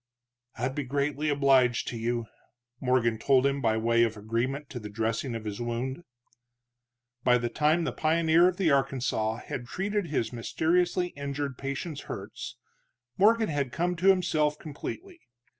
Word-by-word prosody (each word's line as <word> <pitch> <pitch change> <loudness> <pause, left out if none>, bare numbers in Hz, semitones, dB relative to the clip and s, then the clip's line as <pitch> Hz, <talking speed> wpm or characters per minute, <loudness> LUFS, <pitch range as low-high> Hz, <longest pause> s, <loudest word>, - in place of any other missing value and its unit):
"I'd 125 +3 -1
be 145 - -2
greatly 145 +3 -1
obliged 135 -4 +3
to - - -5
you," 115 0 -1 0.5
Morgan 120 -3 +1
told 130 +2 +3
him, 140 0 +1
by 110 -3 +2
way 115 +1 +2
of 115 -2 +1
agreement 120 +7 -2
to 125 - -5
the 105 -2 -7
dressing 115 +4 -2
of 110 -1 -6
his 105 +2 -4
wound. 120 +6 -3 1.2
By 125 -1 +5
the 120 -1 -2
time 155 +6 +2
the - - -1
pioneer 165 +2 +3
of 180 -1 0
the 175 -6 +2
Arkansas 130 -5 +1
had 120 -2 -5
treated 200 +4 -2
his 125 -6 -1
mysteriously 175 +9 +1
injured 140 -2 -4
patient's 140 +3 -4
hurts, - - -7 0.6
Morgan 220 +2 +4
had 140 -4 -1
come 175 +4 0
to 180 +3 +1
himself 160 -6 +3
completely. 340 - -7
140 Hz, 155 wpm, -28 LUFS, 120-160 Hz, 1.2 s, By